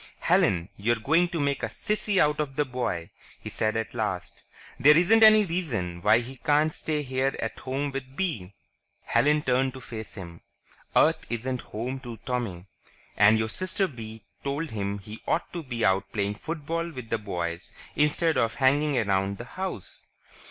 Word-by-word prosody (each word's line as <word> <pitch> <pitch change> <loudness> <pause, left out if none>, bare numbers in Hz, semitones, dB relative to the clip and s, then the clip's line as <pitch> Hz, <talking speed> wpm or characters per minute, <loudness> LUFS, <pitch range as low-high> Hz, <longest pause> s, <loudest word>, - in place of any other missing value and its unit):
"Helen, 90 -1 +3
you're 115 +4 +2
going 160 +10 +2
to 170 -1 -4
make 140 -1 0
a - - -1
sissy 210 -1 -1
out 150 -3 +3
of 140 -3 -2
the 150 - +1
boy," 120 -10 -3 0.3
he - - -7
said 110 0 0
at 110 +1 -3
last. 105 -6 -2 0.5
"There 150 +2 +7
isn't 210 +6 +5
any 215 -1 +8
reason 115 - -2
why 115 +7 +5
he 130 +3 -9
can't 150 +2 +2
stay 150 -2 -2
here 130 0 0
at - - -4
home 135 +2 -2
with 135 -1 -6
Bee." 125 - -3 0.5
Helen 150 +1 +2
turned 130 +1 +1
to - - -7
face 110 -3 -8
him. 85 -4 -9 0.5
"Earth - - +4
isn't 125 +2 -2
home 125 +5 -5
to 120 -3 -8
Tommy. 115 -9 -3 0.5
And 105 +2 +6
your 110 0 -1
sister 185 - 0
Bee 110 - -9 0.2
told 145 +3 -2
him 100 -2 -2
he 105 +2 -10
ought 170 - -1
to 175 - -3
be 120 -6 -2
out 95 +1 +1
playing 100 -2 -1
football 165 +6 -3
with 130 -8 -9
the 115 - +1
boys 85 -4 -4 0.2
instead 150 +2 +2
of 115 -1 +1
hanging 140 +1 +3
around 100 -3 +1
the 120 - -7
house." 185 - -6
130 Hz, 175 wpm, -27 LUFS, 110-150 Hz, 0.5 s, any